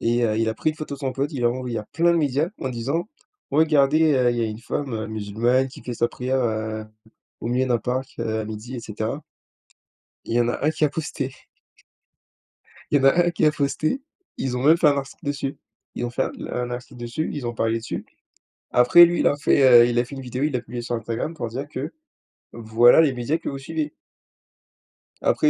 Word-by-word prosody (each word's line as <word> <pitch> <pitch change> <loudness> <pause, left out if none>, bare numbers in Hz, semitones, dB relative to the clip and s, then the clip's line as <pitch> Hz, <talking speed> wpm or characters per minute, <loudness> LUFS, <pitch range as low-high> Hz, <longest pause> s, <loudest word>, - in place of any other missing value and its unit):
et 120 +1 +2
heu, 110 -1 +1
il 115 0 +1
a 110 - -1
pris 155 - 0
une 155 - -11
photo 155 -2 -5
de - - -11
son 135 -2 -2
pote, 140 +4 -2
il 125 -4 -2
a - - +6
envoyé 125 -2 -3
à 105 - -6
plein 170 +1 +3
de - - +2
médias 145 +1 +1
en 130 - -2
disant: 140 - -2 0.4
«Regardez, 155 0 +4
heu, 125 -2 +3
il - - -3
y - - 0
a 115 - +2
une 110 0 -4
femme, 130 +2 -4
heu, 110 -1 -3
musulmane 110 +5 0
qui - - -13
fait 120 - -5
sa 120 - +1
prière, 130 +2 -2
heu, 110 -1 -2 0.6
au - - -3
milieu 125 +2 +1
d'un 120 -3 +1
parc, 130 +1 -2
heu, 110 0 -1
à - - -6
midi» 110 +4 -7
et 120 - -4
cetera 110 +6 -4 1.0
il - - -4
y - - +4
en 120 - +1
a - - -3
1 155 - +3
qui 155 - -2
a - - +1
posté 140 -3 -4 1.6
il 145 - +4
y - - -2
en 135 - +2
a 175 +6 +5
1 175 - +3
qui 160 -2 +1
a 150 - +5
posté. 150 - -1 0.4
Ils 125 -2 -2
ont 125 - -3
même 160 +4 +6
fait 165 - +4
un 140 -1 +3
article 140 +4 -7
dessus. 140 -1 -3 0.4
Ils 120 - -2
ont - - -3
fait 130 - 0
un - - -3 0.2
un 125 0 -2
article 120 0 -7
dessus, 120 +7 -3
ils 135 -5 -4
ont 120 - -3
parlé 115 0 0
dessus. 115 - -5 0.7
Après 125 +8 +8
lui, 170 0 +1
il - - +2
a 145 - +3
fait, 130 -4 +6
heu, - - +3
il 120 0 0
a 120 - +3
fait 120 - -10
une 135 - -6
vidéo, 125 +3 -3
il 150 - 0
l'a 125 - 0
publiée 120 +1 -7
sur 120 0 -3
Instagram 115 +8 -3
pour 120 -7 -4
dire 135 +5 -5
que - - -5 0.6
voilà 115 +4 +5
les 150 -4 +3
médias 125 +6 -1
que 165 - -10
vous 135 - -5
suivez. 150 +2 -4 1.3
Après, 150 - +3
130 Hz, 240 wpm, -23 LUFS, 120-145 Hz, 1.6 s, Après